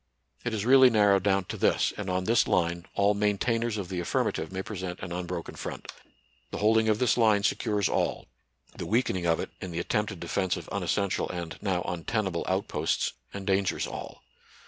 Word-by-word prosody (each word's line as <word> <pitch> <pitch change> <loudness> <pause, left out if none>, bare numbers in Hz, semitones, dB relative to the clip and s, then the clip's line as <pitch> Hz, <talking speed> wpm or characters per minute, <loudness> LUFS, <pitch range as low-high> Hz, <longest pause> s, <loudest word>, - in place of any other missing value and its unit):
It 120 - -1
is 105 0 -2
really 130 0 +8
narrowed 105 -4 +4
down 95 -1 +2
to - - -6
this, - - +2
and 105 -2 -5
on 90 0 0
this 110 +1 +3
line 85 0 0
all 100 +1 +3
maintainers 110 +3 0
of 95 -4 -4
the 90 -2 -3
affirmative 85 - -1
may 95 0 -3
present 95 -4 -5
an 95 - -6
unbroken 90 -1 -4
front. - - -7 0.6
The - - -5
holding 110 +1 +3
of 105 - +3
this 125 +2 +2
line 110 -4 +4
secures 105 -1 +1
all; - - -1 0.5
the - - -5
weakening 100 -6 +1
of 85 -1 +2
it - - -4
in 95 - -5
the 85 - -6
attempted 105 +1 -1
defence 90 +2 -1
of - - -8
unessential 100 -2 0
and 85 -2 -5
now 90 -3 0
untenable 90 +1 -2
outposts 95 +2 0 0.2
endangers 95 -1 0
all. - - -8
100 Hz, 180 wpm, -28 LUFS, 90-105 Hz, 0.6 s, really